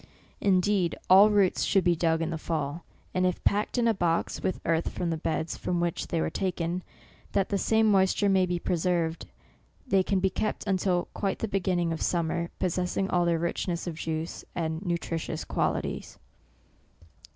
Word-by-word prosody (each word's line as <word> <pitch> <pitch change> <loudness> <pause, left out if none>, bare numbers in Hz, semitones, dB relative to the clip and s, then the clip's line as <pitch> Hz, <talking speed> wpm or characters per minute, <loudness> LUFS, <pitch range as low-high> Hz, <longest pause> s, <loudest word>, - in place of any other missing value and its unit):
Indeed 190 -2 +2
all 195 +3 +9
roots 200 -3 +3
should 195 -2 +3
be 175 0 +3
dug 165 0 +1
in 165 - -2
the 165 - -2
fall, 155 0 -3 0.3
and 185 - +1
if 180 -1 0
packed 210 +5 +1
in 235 -1 +3
a 225 - +4
box, 170 -4 0
with 185 - -1
earth 165 0 +1
from 175 -2 -3
the - - 0
beds 160 0 -2
from 175 -1 -2
which 170 -1 -1
they 165 - -1
were - - -1
taken, 180 -1 -2 0.5
that 195 -1 +1
the 200 - +1
same 220 +2 +3
moisture 195 +1 +3
may 190 -2 +3
be 175 0 -1
preserved, 170 -1 -1 0.6
they 195 -7 +3
can 190 +1 0
be 190 0 +1
kept 215 +3 -2
until 185 -2 +1
quite 195 -2 -1
the 225 - -2
beginning 180 -4 0
of 160 - -5
summer, 170 0 0
possessing 180 +2 -1
all 175 -1 +2
their 170 -1 +2
richness 170 +1 -2
of 175 - -3
juice, 160 +1 -4
and 160 +1 -2
nutritious 165 -3 -3
qualities." - - -2
175 Hz, 175 wpm, -28 LUFS, 165-190 Hz, 0.6 s, all